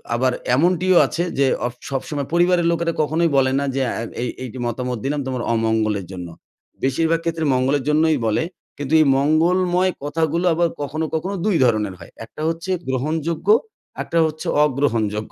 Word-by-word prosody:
আবার 130 +2 +2 0.2
এমনটিও 180 +4 +3
আছে 170 - -2 0.2
যে 140 - +5 0.2
অ - - +2 0.2
সবসময় 140 +1 -3
পরিবারের 175 0 +3
লোকেরা 170 0 0
কখনোই 160 +3 +1
বলে 130 -1 +3
না 140 - -1
যে 135 - 0 0.2
আ - - -3 0.2
এই 125 - -1
এই 130 - -5 0.2
মতামত 125 +1 -3
দিলাম 145 +2 -1
তোমার 130 -2 -2
অমঙ্গলের 110 -3 0
জন্য। 90 -2 -6 0.6
বেশিরভাগ 160 +5 +1
ক্ষেত্রে 165 -1 -1
মঙ্গলের 130 +2 +1
জন্যই 155 +1 +3
বলে 110 +7 +1 0.3
কিন্তু 145 +1 -4
এই - - +4
মঙ্গলময় 175 +5 +2
কথাগুলো 160 +3 0
আবার 170 +1 +2
কখনো, 155 +3 -2
কখনো 185 +5 -2
২ 210 -4 +2
ধরনের 105 -4 +1
হয়। 85 - -13
একটা 135 - -11
হচ্ছে 165 +3 -3 0.2
গ্রহণযোগ্য 155 +6 -2 0.6
একটা 170 - -3
হচ্ছে 155 0 -4 0.2
অগ্রহণযোগ্য 115 -7 -1
150 Hz, 160 wpm, -21 LUFS, 130-165 Hz, 0.6 s, যে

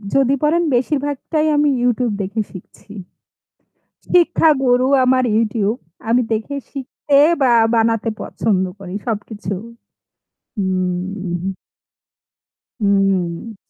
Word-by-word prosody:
যদি 275 0 +3
পরেন 335 +3 +3
বেশির 270 +4 +1
ভাগটাই 305 +2 -1
আমি 295 0 +3
YouTube 245 -2 +1
দেখে 205 +3 -2
শিখছি। 190 +2 -13 1.2
শিক্ষা 345 -2 +4
গরু 250 +1 +3 0.2
আমার 255 0 +3
YouTube। 225 +1 0 0.3
আমি 245 +2 +4
দেখে 225 +6 -3 0.2
শিখতে 275 +1 -1 0.2
বা 255 -2 +4 0.2
বানাতে 225 0 +1
পছন্দ 195 -4 0 0.2
করি 190 0 -7
সবকিছু। 210 -1 -4 1.0
হুম। 185 -1 -2 1.4
হুম। 195 0 0
225 Hz, 95 wpm, -19 LUFS, 195-265 Hz, 1.4 s, শিক্ষা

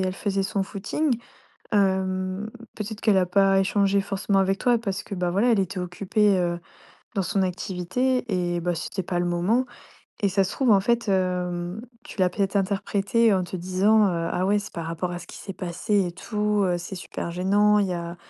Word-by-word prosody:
elle 185 0 -1
faisait 195 0 -1
son 195 0 -1
footing. 225 +8 -1 0.5
Hem, 190 0 0 0.3
peut-être 215 0 -6
qu'elle 210 -3 +4
a 185 - +3
pas 195 +1 +3
échangé 200 0 +2
forcément 195 0 0
avec 195 0 +1
toi 245 -1 +3
parce 200 -4 -3
que, 200 - -6
bah, 180 -1 -1
voilà, 205 +7 +2
elle 220 - +3
était 190 0 -2
occupée, 190 +3 +1
heu, 175 -1 0 0.6
dans 195 - +1
son 195 +3 0
activité 190 +8 -1 0.3
et 175 - -1
bah, 175 0 -1
c'était 190 +3 -4
pas 175 0 -1
le 175 - 0
moment. 185 +9 +1 0.6
Et 200 - +3
ça 195 +1 +2
se - - -4
trouve, 255 -5 +2
en 200 - +6
fait, 235 +2 0
hem, 180 0 -1 0.2
tu - - -11
l'as 185 - +4
peut-être 195 +1 -1
interprété 200 +3 +2
en 185 - +1
te 180 +1 -5
disant: 195 +4 +3
«Heu, 170 -2 -1
ah, 185 - 0
ouais, 205 +1 +3
c'est 205 - -9
par 165 -1 -5
rapport 165 +2 -3
à 175 - -5
ce - - -12
qui - - -10
s'est 195 - -7
passé 185 +3 0
et - - -5
tout, 210 +1 0
heu, 180 -2 +1
c'est 175 +2 -7
super 175 -1 -5
gênant. 205 +4 +3
Il 200 - +1
y 180 - -2
a 170 0 -5
195 Hz, 210 wpm, -25 LUFS, 180-205 Hz, 0.6 s, en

